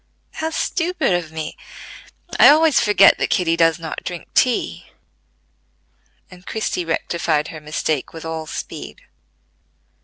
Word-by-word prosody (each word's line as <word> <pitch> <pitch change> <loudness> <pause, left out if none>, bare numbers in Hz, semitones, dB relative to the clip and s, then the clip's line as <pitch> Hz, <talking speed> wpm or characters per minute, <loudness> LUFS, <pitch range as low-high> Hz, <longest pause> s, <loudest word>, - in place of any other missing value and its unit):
"How 320 - -3
stupid 340 - -1
of 175 -3 -2
me! 160 -1 -6 0.8
I - - +9
always 310 0 +5
forget 205 -2 +5
that - - 0
Kitty 165 -2 +1
does 165 -1 +3
not 165 -2 -7
drink 175 -2 -7
tea," 250 -2 0 1.4
and 180 0 -14
Christie 185 -4 -3
rectified 160 -2 -1
her 155 - -9
mistake 150 -1 -2
with 165 0 -9
all 160 -1 -5
speed. - - -7
170 Hz, 125 wpm, -20 LUFS, 160-215 Hz, 1.4 s, I